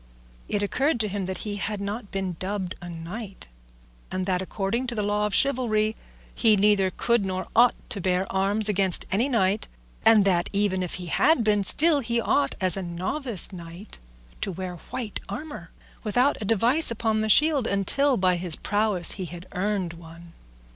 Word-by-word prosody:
It 205 Hz, -1 st, 0 dB
occurred 265 Hz, +6 st, 0 dB
to 215 Hz, -, 0 dB
him 200 Hz, -1 st, -3 dB
that 190 Hz, +4 st, -5 dB
he 205 Hz, -1 st, -4 dB
had 205 Hz, +1 st, -3 dB
not 205 Hz, +2 st, -5 dB
been 190 Hz, -2 st, -3 dB
dubbed 190 Hz, -1 st, -3 dB
a 175 Hz, -, -8 dB
knight, 185 Hz, +5 st, -8 dB, 0.6 s
and 185 Hz, 0 st, -3 dB
that 185 Hz, -1 st, 0 dB
according 200 Hz, +6 st, -2 dB
to 240 Hz, -, -3 dB
the 210 Hz, -, -1 dB
law 210 Hz, +1 st, 0 dB
of 210 Hz, -, -2 dB
chivalry 225 Hz, -5 st, +2 dB, 0.4 s
he 220 Hz, -3 st, +4 dB
neither 200 Hz, -1 st, +3 dB
could 235 Hz, +3 st, 0 dB
nor 185 Hz, -1 st, -3 dB
ought 240 Hz, +1 st, +5 dB, 0.2 s
to 200 Hz, -, -1 dB
bear 185 Hz, +1 st, 0 dB
arms 200 Hz, +3 st, +2 dB
against 195 Hz, -3 st, +2 dB
any 230 Hz, +8 st, +1 dB
knight; 205 Hz, -4 st, +1 dB, 0.4 s
and 220 Hz, -3 st, +6 dB
that 175 Hz, -3 st, +2 dB
even 200 Hz, -2 st, +1 dB
if 180 Hz, -, -2 dB
he 180 Hz, -, -7 dB
had 260 Hz, -, +3 dB
been, 210 Hz, -2 st, +2 dB
still 305 Hz, -, +5 dB
he 235 Hz, -2 st, -1 dB
ought, 145 Hz, -10 st, +1 dB
as 185 Hz, -1 st, +2 dB
a 195 Hz, -, -3 dB
novice 190 Hz, -, 0 dB
knight, 170 Hz, +3 st, -9 dB, 0.4 s
to -, -, -2 dB
wear 180 Hz, 0 st, -6 dB
white 225 Hz, -5 st, -4 dB
armour, 210 Hz, -, -7 dB, 0.3 s
without 245 Hz, +6 st, +2 dB
a -, -, -3 dB
device 235 Hz, +9 st, +2 dB
upon 220 Hz, -1 st, 0 dB
the 220 Hz, -, -1 dB
shield 290 Hz, +1 st, +4 dB
until 255 Hz, +8 st, +1 dB
by 185 Hz, -1 st, +2 dB
his 175 Hz, -2 st, -2 dB
prowess 205 Hz, -4 st, +1 dB
he 190 Hz, -, -5 dB
had 175 Hz, +1 st, -9 dB
earned 190 Hz, -2 st, -2 dB
one. 170 Hz, 0 st, -13 dB
200 Hz, 180 wpm, -25 LUFS, 185-225 Hz, 0.6 s, and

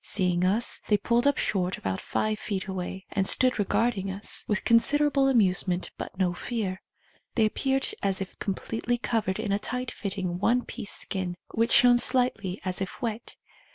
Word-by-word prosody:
Seeing 180 Hz, -3 st, 0 dB
us, 205 Hz, +6 st, +2 dB
they 210 Hz, -, +4 dB
pulled 240 Hz, +5 st, +1 dB
up 285 Hz, -, +3 dB
short 185 Hz, -2 st, -1 dB
about 95 Hz, -1 st, -3 dB
five 215 Hz, 0 st, -1 dB
feet 195 Hz, -3 st, -3 dB
away, 190 Hz, 0 st, -5 dB
and 195 Hz, -1 st, 0 dB
stood 255 Hz, -3 st, +3 dB
regarding 205 Hz, 0 st, 0 dB
us 195 Hz, +2 st, -2 dB
with 210 Hz, -, 0 dB
considerable 275 Hz, +4 st, +4 dB
amusement 185 Hz, -7 st, +2 dB
but -, -, -8 dB
no 180 Hz, -2 st, +1 dB
fear. 195 Hz, -1 st, -4 dB, 0.5 s
They 225 Hz, -, +4 dB
appeared 270 Hz, +5 st, 0 dB
as 195 Hz, -1 st, 0 dB
if 190 Hz, -1 st, -7 dB
completely 225 Hz, +4 st, -2 dB
covered 220 Hz, -5 st, -1 dB
in 220 Hz, -2 st, -2 dB
a 200 Hz, -, +1 dB
tight 250 Hz, +2 st, -4 dB
fitting 185 Hz, -3 st, -4 dB
one 245 Hz, +5 st, +2 dB
piece 220 Hz, -5 st, -5 dB
skin, 185 Hz, -3 st, -2 dB, 0.2 s
which 230 Hz, +1 st, +1 dB
shone 245 Hz, -1 st, +6 dB
slightly 220 Hz, -8 st, +1 dB
as 185 Hz, 0 st, -2 dB
if 190 Hz, -, -5 dB
wet. 230 Hz, -1 st, -4 dB
205 Hz, 170 wpm, -27 LUFS, 190-240 Hz, 0.5 s, shone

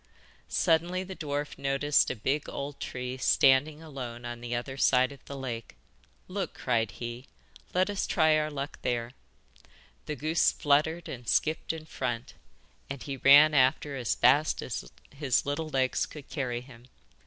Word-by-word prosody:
Suddenly 175 Hz, +2 st, +1 dB
the 190 Hz, 0 st, -8 dB
dwarf 145 Hz, -3 st, -4 dB
noticed 140 Hz, +1 st, +2 dB
a -, -, -2 dB
big 135 Hz, +6 st, -1 dB
old 140 Hz, 0 st, -5 dB
tree 125 Hz, 0 st, -5 dB
standing 145 Hz, +4 st, +3 dB
alone 125 Hz, -6 st, -7 dB
on 120 Hz, 0 st, -6 dB
the 120 Hz, 0 st, -3 dB
other 130 Hz, +3 st, -4 dB
side 130 Hz, -1 st, +3 dB
of 140 Hz, -, -13 dB
the 140 Hz, -, -7 dB
lake. 120 Hz, -, -6 dB, 0.5 s
'Look,' 185 Hz, -2 st, -4 dB
cried 115 Hz, -4 st, 0 dB
he, 120 Hz, +2 st, -7 dB, 0.5 s
'let 185 Hz, +1 st, +3 dB
us 205 Hz, -1 st, -2 dB
try 160 Hz, -2 st, +4 dB
our 155 Hz, 0 st, +1 dB
luck 145 Hz, 0 st, -5 dB
there.' 120 Hz, -1 st, -1 dB, 1.0 s
The 150 Hz, -, -2 dB
goose 155 Hz, +3 st, +2 dB
fluttered 155 Hz, +3 st, +1 dB
and 120 Hz, -2 st, -8 dB
skipped 160 Hz, +1 st, +1 dB
in 160 Hz, -1 st, -7 dB
front, 120 Hz, -6 st, -4 dB, 0.6 s
and 140 Hz, -1 st, -6 dB
he 140 Hz, -2 st, -5 dB
ran 145 Hz, +4 st, +7 dB
after 140 Hz, +1 st, +3 dB
as 125 Hz, -4 st, -1 dB
fast 150 Hz, +2 st, +3 dB
as -, -, -5 dB, 0.3 s
his 140 Hz, -3 st, +1 dB
little 145 Hz, +3 st, -2 dB
legs 130 Hz, -3 st, +1 dB
could 150 Hz, -3 st, -11 dB
carry 125 Hz, -5 st, -2 dB
him. 125 Hz, -2 st, -15 dB
140 Hz, 160 wpm, -29 LUFS, 125-155 Hz, 1.0 s, ran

